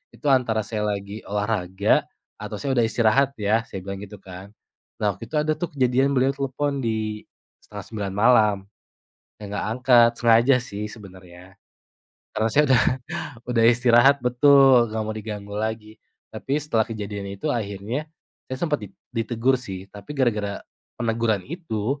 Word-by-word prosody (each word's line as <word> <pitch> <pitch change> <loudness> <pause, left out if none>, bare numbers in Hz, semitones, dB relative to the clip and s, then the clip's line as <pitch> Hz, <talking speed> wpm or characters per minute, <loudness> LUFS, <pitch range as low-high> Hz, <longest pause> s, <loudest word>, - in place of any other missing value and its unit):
itu - - -18
antara 115 -5 +2
saya 105 0 -3
lagi 100 +1 -4
olahraga 100 -1 0 0.3
atau - - -5
saya 140 -2 -2
udah 120 -2 +3
istirahat 130 +5 +2
ya." 105 +2 +1
Saya 95 -1 -7
bilang 100 0 -6
gitu 105 0 -9
kan. 95 +1 -11 0.5
Nah, 105 -2 0
waktu - - -11
itu 155 - -2
ada 155 +1 +1
tuh 160 +2 -4
kejadian 130 +2 +2
beliau 130 +2 +2
telepon 140 +1 -2
di 110 -2 -2 0.4
8.30 100 -4 -6
malam. 105 -3 +5 0.8
Saya - - -8
enggak 100 +1 -3
angkat, 120 -1 +5
sengaja 120 +3 +5
sih 105 -3 -6
sebenarnya. 95 -3 -13 0.7
Karena 110 +1 0
saya 150 - +5
udah, 125 -3 +5 0.7
udah 120 -2 +2
istirahat 120 +3 +5
betul, 125 -1 +5
enggak 110 0 -2
mau 110 - -3
diganggu 105 -2 -7
lagi. 110 0 -3 0.4
Tapi 140 +2 -2
setelah 130 -7 0
kejadian 100 -2 -5
itu 145 +9 -2
akhirnya 110 +6 -4 0.4
saya 130 - -4
sempat 150 -1 -1
di 105 - -8 0.2
ditegur 120 +2 0
sih, 95 -5 -7
tapi 105 +8 -9
gara-gara 105 -6 0 0.4
peneguran 115 -4 0
itu, 140 - -3
115 Hz, 150 wpm, -23 LUFS, 105-130 Hz, 0.8 s, malam